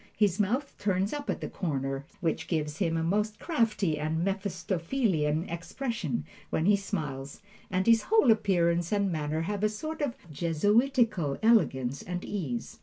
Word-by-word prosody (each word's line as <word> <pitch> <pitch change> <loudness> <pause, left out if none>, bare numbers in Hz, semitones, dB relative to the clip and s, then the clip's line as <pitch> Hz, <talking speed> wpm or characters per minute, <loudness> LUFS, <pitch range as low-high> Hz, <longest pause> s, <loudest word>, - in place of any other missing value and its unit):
His 205 -2 +2
mouth 250 +8 0
turns 195 +1 0
up 290 -1 -5
at - - -1
the - - -3
corners, 135 -6 -2 0.2
which 165 -3 -1
gives 150 -3 -2
him 165 -4 +1
a 160 - 0
most 210 +5 0
crafty 215 - +1
and 160 +3 -1
Mephistophelian 185 - 0
expression 170 - -3 0.2
when 160 - 0
he 205 +1 +6
smiles, 150 -9 -4 0.3
and 185 0 0
his 230 -1 +6
whole 435 - +6
appearance 175 -5 +2
and 200 -2 +2
manner 155 0 -1
have 200 +4 -2
a 215 - +4
sort 310 +9 -5
of 270 -4 -1 0.2
Jesuitical 205 - +2
elegance 140 - +3
and 180 0 -5
ease. 145 - -4
185 Hz, 155 wpm, -29 LUFS, 160-215 Hz, 0.3 s, he